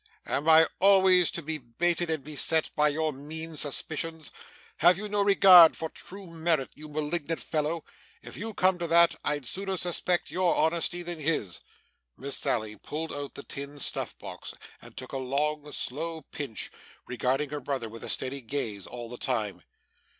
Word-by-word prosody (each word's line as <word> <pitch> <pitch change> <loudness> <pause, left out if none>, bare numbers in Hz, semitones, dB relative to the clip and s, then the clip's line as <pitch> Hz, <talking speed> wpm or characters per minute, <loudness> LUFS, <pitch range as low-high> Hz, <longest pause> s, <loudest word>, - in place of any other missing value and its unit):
Am 150 +3 -1
I 160 0 +7
always 190 -2 +5
to 170 - -5
be 155 +1 -3
baited, 170 +8 -1
and 160 -4 -2
beset, 155 +2 +2
by 150 0 +4
your 155 +1 -1
mean 160 +4 -6
suspicions? 155 +2 0 0.5
Have 175 +2 +5
you 210 +2 -5
no 205 0 0
regard 190 -4 +8
for 160 - -4
true 195 +4 -10
merit, 165 -4 -1
you 155 0 -11
malignant 155 +2 -3
fellow? 155 +1 -2 0.4
If - - -10
you 220 +1 -6
come 185 -1 +3
to 170 - -2
that, 170 +1 +5
I'd 145 -2 -1
sooner 195 +7 -3
suspect 175 0 0
your 180 -1 +1
honesty 170 +2 +1
than 175 -1 -5
his.' 145 - -1 0.6
Miss 140 0 -1
Sally 110 -2 0
pulled 160 +2 -5
out 145 -1 -6
the 140 - -6
tin 140 +1 -6
snuff - - 0
box, - - -8 0.3
and - - -14
took 130 - -7
a 135 - -3
long, 150 +3 -2
slow 160 +5 -3
pinch, 135 -7 -3 0.3
regarding 135 +3 -1
her 150 - -3
brother 130 -3 -3
with 115 +1 -10
a - - -3
steady 135 +1 -1
gaze 115 -6 -4
all 120 -1 -7
the 125 +1 -8
time. 110 -7 -2
155 Hz, 170 wpm, -28 LUFS, 140-170 Hz, 0.6 s, regard